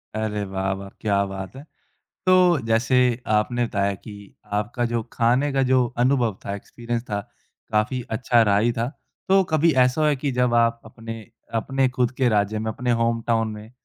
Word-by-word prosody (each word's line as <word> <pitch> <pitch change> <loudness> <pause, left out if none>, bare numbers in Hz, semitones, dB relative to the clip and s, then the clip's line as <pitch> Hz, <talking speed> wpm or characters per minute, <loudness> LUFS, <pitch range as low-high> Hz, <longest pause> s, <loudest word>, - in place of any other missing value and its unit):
अरे 105 -1 -2
वाह-वाह, 95 0 -3
क्या 100 -2 +2
बात 95 +3 -7
है। 135 - -9 0.6
तो, 180 -3 +5
जैसे 115 +3 +3 0.4
आपने 120 +3 0
बताया 100 -3 0
कि 100 +1 -12 0.3
आपका 120 +3 -2
जो 115 - +1
खाने 125 +5 +2
का 135 - +2
जो 130 -1 +4 0.2
अनुभव 125 -6 +1
था, 100 - -3
एक्सपीरियंस 120 +3 -5
था, 105 -1 -1 0.5
काफ़ी 110 +4 0 0.2
अच्छा 120 -1 +3
रहा 105 -2 +3
ही 115 +4 +2
था। 115 0 -1 0.4
तो 195 0 +5
कभी 160 +1 +4
ऐसा 130 +3 +3
हुआ 155 - +4
है 150 - +2
कि 140 +1 -2
जब 125 -1 +1
आप 115 0 +3
अपने 115 -1 -9 0.3
अपने 135 +4 +1
खुद 125 -1 0
के 130 -2 +3
राज्य 105 0 +1
में, 110 0 -2
अपने 125 +2 -2
होमटाउन 115 -1 +1
में, 105 +1 -10
115 Hz, 180 wpm, -23 LUFS, 105-125 Hz, 0.6 s, तो